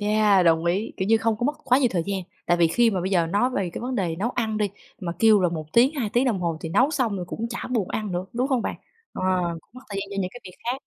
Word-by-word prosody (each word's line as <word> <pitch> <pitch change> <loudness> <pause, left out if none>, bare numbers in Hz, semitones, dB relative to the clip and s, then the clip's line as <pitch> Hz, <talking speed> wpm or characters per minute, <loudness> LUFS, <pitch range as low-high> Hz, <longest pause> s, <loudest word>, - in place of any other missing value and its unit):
Yeah, 210 -2 +3
đồng 165 0 +3
ý, 190 +6 0
kiểu 190 - -2
như, 225 - +6
không 225 -1 0
có 240 - -1
mất 290 - +2
quá 255 0 +4
nhiều 255 - +3
thời 175 -3 0
gian. 195 -1 -1 0.3
Tại 175 - +3
vì 170 - +4
khi 235 +7 +3
mà 190 -4 -1
bây 185 +2 -2
giờ 175 -4 +3
nói 205 +9 +1
về 195 -8 -2
cái - - -5
vấn 250 +2 -3
đề 175 -7 -1
nấu 215 +7 -1
ăn 220 -3 -1
đi, 205 -2 0 0.3
mà 170 -3 -3
kêu 220 0 +6
là 180 - +3
1 160 -2 -4
tiếng 255 +6 +5
2 240 -8 -2
tiếng 245 +2 +3
đồng 225 -8 0
hồ 170 -2 -1
thì 165 - -5
nấu 255 - +3
xong 255 -9 0
rồi 180 - -4
cũng 230 - -3
chả 235 - -5
buồn 225 -7 0
ăn 210 -4 -3
nữa, 175 +1 -2
đúng 250 +3 0
không 255 -4 +1
bạn? - - -2 0.4
Ờ, - - -5 0.4
cũng - - -36
mất 255 - -11
thời 200 -2 -4
gian 200 - -6
cho 200 - -6
những 185 - -2
cái 245 - -11
việc 180 -1 -10
khác. 250 +3 -2
210 Hz, 310 wpm, -24 LUFS, 180-240 Hz, 0.4 s, như